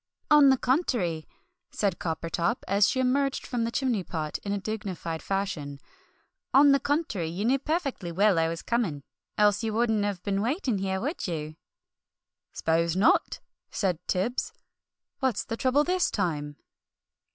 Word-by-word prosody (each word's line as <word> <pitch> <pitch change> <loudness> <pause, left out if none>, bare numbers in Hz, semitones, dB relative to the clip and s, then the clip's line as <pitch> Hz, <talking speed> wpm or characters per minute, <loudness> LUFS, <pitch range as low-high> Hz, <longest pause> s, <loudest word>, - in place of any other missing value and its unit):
"On 295 -2 +8
the 265 - +5
contery," 240 - 0 0.4
said 195 -4 -1
Coppertop, 165 +1 -2
as 200 +2 +4
she 260 - -1
emerged 270 +2 +1
from 240 -2 -1
the 230 - -2
chimney 245 -7 0
pot 155 -3 -4
in 200 - -5
a 205 - 0
dignified 190 -5 -4
fashion, 185 -8 -3 0.8
"on 280 +1 +7
the 275 - +4
contery, 285 - -1
you 180 +6 -3
knew 265 +3 +3
perfectly 275 - -2
well 195 0 +3
I 165 - +2
was 165 0 -4
coming, 195 - -1 0.3
else 210 +1 +3
you 220 -1 -2
wouldn't 225 -2 +2
have 200 -3 -3
been 200 -1 0
waiting 245 - -1
here, 190 0 -1
would 285 - -3
you?" 155 -3 -4 1.0
"'Spose 165 +1 0
not!" 195 +6 +2 0.3
said 185 -5 -1
Tibbs. 220 +7 -1 0.7
"What's 260 -6 0
the 225 - -3
trouble 265 +4 +2
this 360 +2 +1
time?" 150 -7 -2
205 Hz, 150 wpm, -27 LUFS, 170-255 Hz, 1.0 s, On